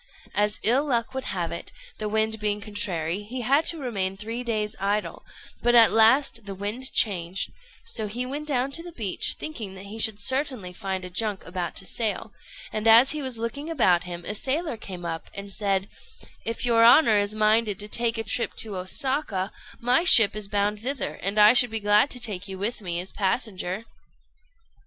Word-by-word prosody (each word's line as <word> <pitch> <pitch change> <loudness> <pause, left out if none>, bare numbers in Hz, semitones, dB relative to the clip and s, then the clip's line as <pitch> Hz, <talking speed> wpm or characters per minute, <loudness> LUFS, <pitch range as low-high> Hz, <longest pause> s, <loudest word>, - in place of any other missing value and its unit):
As 210 0 0
ill 265 +7 +3
luck 240 -1 -1
would 265 0 -4
have 175 -3 -3
it, 170 - -7 0.3
the 215 -1 -3
wind 220 +1 0
being 210 0 -1
contrary, 195 -4 -3
he 245 +5 -6
had 275 +7 +2
to 335 - -1
remain 195 -9 -3
three 225 +4 -5
days 215 -3 -2
idle; 205 +2 -2 0.4
but 240 0 +3
at 230 -2 +7
last 230 +1 +4
the 195 - -5
wind 210 +7 -3
changed; 185 -3 0 0.3
so 220 -3 -2
he 240 +5 -3
went 290 +4 -5
down 270 -2 0
to 330 - 0
the 350 +1 -9
beach, 215 - +1
thinking 220 -11 -6
that 190 +1 -10
he 215 +3 -9
should 215 -2 +1
certainly 260 -5 -1
find 190 0 -4
a 180 - -9
junk 210 +1 -3
about 180 -2 -4
to 195 - -5
sail; 220 +2 -3 0.4
and 215 +1 -1
as 230 +4 +7
he 305 0 -3
was 260 -4 -1
looking 235 +7 -4
about 190 - +2
him, 175 -1 -7
a - - -3
sailor 280 +7 -2
came 185 -5 -8
up, 165 -1 -5
and 200 0 -5
said 195 -1 0 0.6
"If 230 +2 -2
your 230 -1 +4
honour 230 -3 +6
is 205 +1 -1
minded 215 -1 +2
to 210 - -5
take 230 +1 0
a 225 - -2
trip 235 - -1
to 210 -4 -2
Osaka, 200 0 -1 0.3
my 250 +7 +2
ship 225 - +7
is 210 -2 -4
bound 205 +1 0
thither, 265 +5 -3
and 200 +2 0
I 210 +2 +8
should 245 -1 +7
be 225 0 -2
glad 210 +5 +3
to 250 - -6
take 205 -5 -2
you 190 -1 -7
with 215 +4 -3
me 175 -3 -3
as 185 +2 -4
passenger." 195 -1 -2
215 Hz, 200 wpm, -25 LUFS, 195-245 Hz, 0.6 s, I